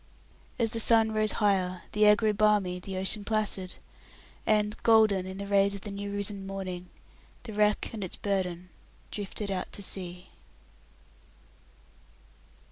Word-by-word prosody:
As 230 -4 0
the 230 - -2
sun 225 0 +4
rose 215 0 +1
higher 185 -4 +1
the 210 0 +4
air 210 - +8
grew 215 0 +1
balmy, 205 -4 +2
the 190 +1 -6
ocean 190 +2 -1
placid; 205 -4 -1 0.7
and, 210 -1 +2
golden 215 -5 +4
in 190 0 -6
the 200 - -5
rays 200 0 +3
of 200 - -7
the 205 - -7
new 200 0 -5
risen 200 -1 -3
morning, 185 -2 -5 0.5
the 225 -3 -8
wreck 210 0 +2
and 215 -3 -4
its 185 - -5
burden 180 -3 -2 0.4
drifted 205 0 -4
out 185 -1 -3
to 200 - -3
sea. 180 -1 -2
200 Hz, 145 wpm, -29 LUFS, 190-210 Hz, 0.7 s, air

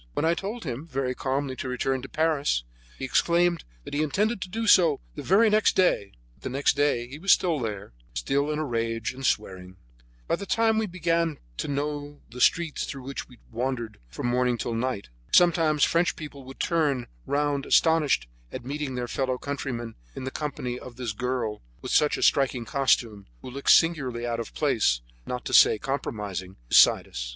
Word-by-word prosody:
When 155 - 0
I 165 - +4
told 205 +7 -5
him, 135 +1 -5
very 130 -4 -2
calmly, 135 0 -2
to 130 - -4
return 130 +1 -1
to 135 - -9
Paris, 150 - +1 0.3
he - - -4
exclaimed 170 +5 +2 0.2
that - - -9
he 145 - +1
intended 200 - 0
to 185 - -5
do 225 +4 -3
so 185 -5 +5
the - - -6
very 205 +6 +4
next 215 0 +3
day; 175 - +2 0.2
but 65 - -30
the - - -4
next 135 +2 +1
day 140 -5 +1
he 140 +4 -9
was 195 +4 +3
still 170 -5 +3
there, 105 - -5 0.2
still 140 +2 0
in 150 - -1
a 155 - -1
rage 115 -2 -2
and 135 +1 -10
swearing. 95 -6 -2 0.5
By - - +1
this 200 - -7
time 225 -2 +2
we 220 - -1
began 170 -3 0 0.2
to - - -3
be 145 - -2
known 145 0 -2
in 145 0 -15
the 125 +1 -7
streets 165 +1 +2
through 135 -2 -7
which 135 +1 -6
we 125 - -16
wandered 120 -2 -3
from - - -6
morning 125 0 +1
till 115 - -3
night. 115 - -2 0.2
Sometimes 165 -4 +4
French 170 +1 +2
people 145 -3 -9
would 135 +1 -11
turn 145 -7 +1 0.2
round 145 -1 0
astonished 155 - +3 0.2
at 125 - -7
meeting 140 -1 -3
their 125 -1 -3
fellow 130 0 -1
countrymen 125 -5 -4 0.2
in - - -6
the 130 - -4
company 125 -5 -4
of 125 - -11
this 125 -2 -3
girl 120 -1 -3 0.2
with - - -2
her 150 - +5
striking 130 -4 +2
costume, 115 -6 +1 0.2
who 125 - -7
looked 140 +2 -3
singularly 130 -8 +3
out 120 -1 -2
of 115 - -6
place, 110 - +2 0.3
not 125 0 -4
to - - -4
say - - +7
compromising, 105 -8 -4
beside - - +6
us. - - -5
135 Hz, 195 wpm, -26 LUFS, 120-160 Hz, 0.5 s, say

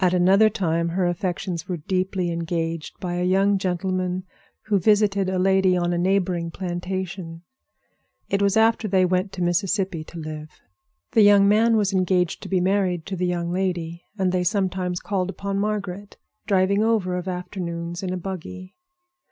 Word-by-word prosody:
At 180 0 +3
another 195 +4 +5
time 170 -5 0
her 180 +2 0
affections 175 -1 -2
were 180 - -1
deeply 185 +2 -1
engaged 165 -1 -3
by 175 -1 -3
a 180 - 0
young 195 +2 +3
gentleman 185 0 -1 0.4
who 205 -2 +1
visited 200 0 +3
a 190 - -1
lady 190 0 +3
on 175 0 0
a - - 0
neighboring 180 -2 +1
plantation. 180 -1 -5 0.8
It 200 - 0
was 200 +1 +2
after 225 0 +3
they 190 -2 +3
went 185 +2 0
to 180 - -3
Mississippi 185 -1 0
to 170 - -11
live. 155 -1 -6 0.6
The 225 - +4
young 205 -1 +6
man 225 +2 +4
was 205 -2 +1
engaged 180 -2 +1
to - - -8
be 190 - +2
married 185 -3 +1
to 195 - -4
the 180 0 -1
young 175 -1 -2
lady, 175 -2 -2
and 190 -2 +1
they 180 -1 +1
sometimes 185 -2 -1
called 190 -2 -2
upon 195 0 -3
Margaret, 205 -1 -3 0.3
driving 200 0 +3
over 215 -5 +1
of 180 +1 -4
afternoons 175 -2 -4
in 185 -2 -3
a 185 - -2
buggy. 185 +1 -7
185 Hz, 170 wpm, -23 LUFS, 175-195 Hz, 0.8 s, young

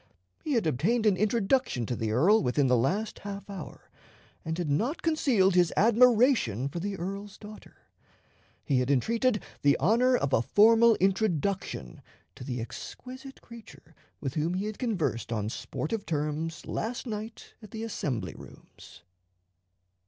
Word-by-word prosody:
He 300 - -2
had 230 -7 +1
obtained 185 - +1
an 205 -3 +4
introduction 215 - +1
to 120 - -3
the 110 -2 -2
earl 180 - +4
within 135 +3 +1
the 125 -1 +3
last 185 - -1
half 200 0 -7
hour, 195 -5 -10 0.5
and 160 +1 -3
had 175 -3 -2
not 225 - -1
concealed 255 - +2
his 175 -2 +3
admiration 230 - +4
for 170 - -5
the 195 +2 -4
earl's 195 +3 -6
daughter. 215 0 -12 0.9
He 135 -4 +2
had 125 +1 -1
entreated 225 - +1 0.2
the 140 -1 +4
honor 240 - +3
of 140 - -2
a - - +4
formal 225 - +5
introduction 190 - -1 0.3
to - - -11
the 125 -1 -4
exquisite 255 - -9
creature 225 -8 -14 0.3
with 135 -3 -4
whom 160 +4 -1
he 190 +2 -2
had 215 0 -5
conversed 160 - -2
on 105 -2 -2
sportive 200 - -4
terms 155 +2 -3
last 240 +4 -4
night 220 -1 -7
at 215 - -12
the 220 +2 -6
Assembly 145 - -3
Rooms. - - -15
195 Hz, 150 wpm, -28 LUFS, 145-225 Hz, 0.9 s, formal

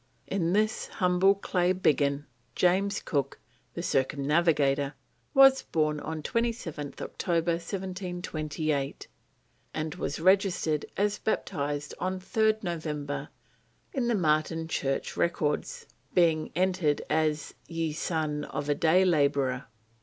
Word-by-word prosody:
In 175 -3 0
this 215 +2 +1
humble 185 +1 +3
clay 180 -2 +1
biggin 145 -5 +1 0.3
James 195 +3 +2
Cook, 140 -3 -1 0.4
the - - -4
Circumnavigator, 140 0 +2 0.4
was 270 0 +7
born 155 -2 0
on 155 0 -5
27th 225 - -2
October 170 -1 -1
1728, 170 -5 -3 0.7
and 155 -1 -2
was 145 - -3
registered 180 -4 +2
as 205 +1 +1
baptised 145 -7 -2
on 185 +1 -2
3rd 220 +3 +1
November 150 -5 -3 0.6
in 255 -3 0
the 240 - +2
Marton 160 -2 +1
church 135 -4 -2
records, 170 - -1 0.3
being 165 -3 +3
entered 180 -4 +1
as 155 -2 0
"ye 165 -2 -2
son 155 -2 -2
of 145 +1 -4
a - - +4
day 170 +5 +4
labourer." 140 -5 +2
160 Hz, 110 wpm, -28 LUFS, 150-185 Hz, 0.7 s, was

